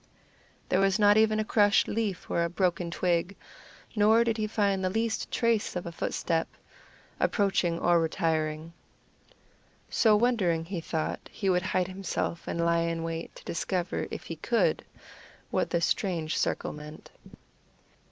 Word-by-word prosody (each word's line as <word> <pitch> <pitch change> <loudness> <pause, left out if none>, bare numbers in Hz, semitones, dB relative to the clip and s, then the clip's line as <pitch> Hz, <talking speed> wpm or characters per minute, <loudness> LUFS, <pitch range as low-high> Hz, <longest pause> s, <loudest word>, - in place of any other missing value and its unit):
There 185 - +2
was 195 0 +3
not 205 -1 +5
even 215 0 +3
a 215 - 0
crushed 205 -1 +3
leaf 210 -4 -2
or 170 - 0
a 170 - -1
broken 175 -1 0
twig, 175 +2 0 0.6
nor 220 +2 +5
did 230 -1 0
he 215 -1 -1
find 200 -3 0
the 185 - +1
least 225 +3 -1
trace 230 -4 0
of 180 - -3
a 170 - -5
footstep, 165 0 -1 0.7
approaching 195 -5 +1
or 175 0 +3
retiring. 160 0 -1 1.2
So 220 -2 +4
wondering 205 -8 +1
he 175 -1 -4
thought 160 -1 -3
he 195 -3 0
would 180 0 +2
hide 185 -1 0
himself 185 -3 -4
and 170 0 -1
lie 170 0 +3
in 165 0 -1
wait 165 0 -5
to - - -13
discover, 175 +2 -2
if - - -6
he - - -7
could, - - +1 0.7
what - - 0
this 170 -1 +1
strange 170 -6 -1
circle - - -1
meant. 150 +1 -11
185 Hz, 150 wpm, -28 LUFS, 170-210 Hz, 1.2 s, not